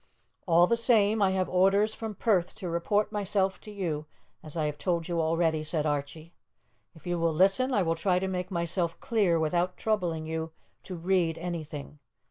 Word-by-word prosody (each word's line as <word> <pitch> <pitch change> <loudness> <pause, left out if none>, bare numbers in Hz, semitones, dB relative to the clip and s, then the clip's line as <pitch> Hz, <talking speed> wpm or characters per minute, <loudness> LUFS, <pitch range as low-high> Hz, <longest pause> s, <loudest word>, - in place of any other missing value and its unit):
"All 170 0 +6
the 235 - +2
same, 220 -2 +3
I 195 - +4
have 185 -1 0
orders 195 +4 +3
from 220 -2 -6
Perth 190 -6 +1
to 185 - -6
report 205 +6 0
myself 195 -2 -1
to - - -11
you, 165 -7 -3 0.3
as 155 +1 -8
I 155 - +1
have 150 -1 -3
told 170 +2 -1
you 170 -1 0
already," 160 -1 +1
said 155 0 -2
Archie. 150 +3 -3 0.6
"If 160 - -17
you 175 -1 -1
will 165 0 +2
listen, 195 +11 +3
I 205 -6 +2
will 165 -1 +1
try 180 +2 +1
to 190 +1 -1
make 180 -1 -3
myself 170 -1 -2
clear 200 -7 +2
without 175 +3 0
troubling 175 -8 -1
you 160 0 -4 0.3
to 185 - -6
read 170 -1 +1
anything. 155 -4 -6
175 Hz, 185 wpm, -28 LUFS, 160-195 Hz, 0.6 s, All